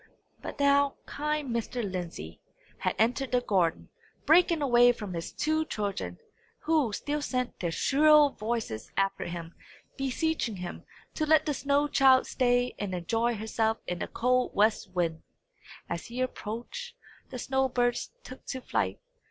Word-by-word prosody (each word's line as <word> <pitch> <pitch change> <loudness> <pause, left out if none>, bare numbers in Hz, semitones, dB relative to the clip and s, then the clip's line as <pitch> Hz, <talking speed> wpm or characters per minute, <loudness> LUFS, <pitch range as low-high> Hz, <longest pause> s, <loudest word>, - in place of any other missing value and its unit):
But - - -7
now 280 0 +4
kind 300 -2 -2
Mr. 235 +1 -2
Lindsey 175 - -6 0.4
had - - -1
entered 250 +4 +1
the 250 - +4
garden, 185 -8 0 0.4
breaking 330 0 +4
away 245 -2 +6
from 210 -5 -7
his 170 0 -5
two 315 +1 0
children, 195 - -3 0.4
who 305 -8 +2
still 295 +7 -2
sent 255 -3 -2
their 175 - -1
shrill 295 - +5
voices 215 - -4
after 195 0 0
him, 170 -1 -6 0.4
beseeching 270 -3 -1
him 180 -1 -7 0.3
to 310 - -1
let 315 0 +5
the 300 - 0
snow 285 +2 +1
child 265 -2 +5
stay 245 -1 +1
and 195 -3 -3
enjoy 225 +7 0
herself 220 +1 0
in 180 -1 -3
the - - -3
cold 250 +1 +1
west 215 +2 +2
wind. 165 -3 -1 0.7
As 170 - -4
he 240 +1 -6
approached, 255 - -4 0.3
the - - -6
snow 265 +2 0
birds 245 -1 0
took 255 - -11
to 260 - -3
flight. - - -1
245 Hz, 150 wpm, -29 LUFS, 205-280 Hz, 0.7 s, away